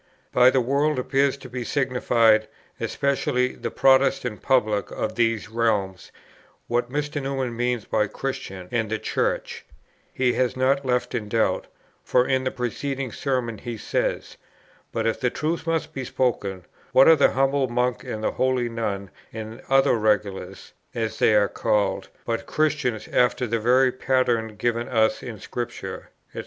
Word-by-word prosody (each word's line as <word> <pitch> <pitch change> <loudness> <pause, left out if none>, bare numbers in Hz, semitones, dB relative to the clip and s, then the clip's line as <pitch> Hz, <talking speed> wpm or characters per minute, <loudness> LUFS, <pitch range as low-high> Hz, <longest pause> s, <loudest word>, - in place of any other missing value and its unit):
By 125 0 +6
the 130 0 +2
world 140 +4 +1
appears 135 +2 +1
to 135 - -11
be 125 0 -5
signified, 120 -5 +2 0.3
especially, 130 -2 0
the - - -5
Protestant 130 -4 +2
public 110 -6 +1
of 110 - -3
these 115 -2 0
realms; 105 -4 -1 0.5
what 120 +1 -1
Dr. 145 +1 -2
Newman 135 -3 -2
means 120 -1 -1
by 105 -1 +1
Christians, 95 -6 -5
and 115 -3 0
the 110 - -1
Church, - - -2 0.5
he 125 -1 +1
has 130 0 0
not 135 +2 +2
left 125 -1 0
in 110 -4 -3
doubt; 115 0 +1 0.4
for 125 0 +3
in 130 -1 +1
the - - +2
preceding 130 +1 -3
Sermon 125 -4 -2
he 120 -2 -6
says: - - -2 0.5
'But - - -2
if 115 - 0
the 125 - +1
truth 160 +6 -3
must 165 -1 -1
be 135 - -4
spoken, 100 -8 -1 0.3
what 135 - +7
are 165 - +9
the 140 - +3
humble 135 0 +2
monk 125 0 -1
and 110 -4 -5
the - - +1
holy 130 -2 0
nun, 100 -4 -3 0.2
and 110 +2 -7
other 135 0 +4
regulars, 105 -3 -1 0.2
as 110 -1 -3
they 110 - +4
are 105 -1 +4
called, 100 -1 0 0.2
but 115 -1 -3
Christians 150 -7 0
after 125 0 +2
the 115 0 -1
very 125 +3 +4
pattern 120 -4 0
given 115 +2 -1
us 110 -3 +2
in 115 -3 -7
Scripture, 120 +3 -6 0.2
&c.'.... - - -6
125 Hz, 160 wpm, -24 LUFS, 110-130 Hz, 0.5 s, are